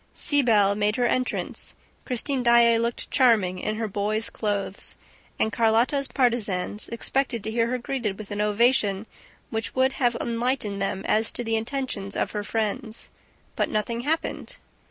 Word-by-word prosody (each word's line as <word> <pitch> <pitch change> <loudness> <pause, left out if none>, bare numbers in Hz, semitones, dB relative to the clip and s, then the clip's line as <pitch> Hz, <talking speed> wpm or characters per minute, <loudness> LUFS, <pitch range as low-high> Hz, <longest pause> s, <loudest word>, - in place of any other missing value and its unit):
Siebel 225 -9 +4
made 210 +1 +1
her 245 - +1
entrance. 255 +1 -1 0.3
Christine 260 +1 -1
Daae 235 -1 +5
looked 235 +1 -3
charming 210 -8 +3
in 215 - -2
her 220 0 -2
boy's 210 +2 -1
clothes; 205 -2 -3 0.4
and 220 - +1
Carlotta's 235 +5 +2
partisans 220 -7 0
expected 235 -1 -1
to 220 - -3
hear 230 0 +1
her 250 +1 -1
greeted 235 -5 -3
with 215 -1 -9
an 205 0 -2
ovation 210 -1 +2 0.5
which 225 0 -3
would 260 +1 +3
have 245 -3 +1
enlightened 235 -4 -1
them 195 -1 -1
as 220 +1 +3
to 240 - -2
the 225 -1 0
intentions 225 -4 -3
of - - -1
her 210 -1 -3
friends. 220 +2 -3 0.4
But - - 0
nothing 230 +2 -1
happened. 315 +5 -3
225 Hz, 155 wpm, -25 LUFS, 210-245 Hz, 0.5 s, Daae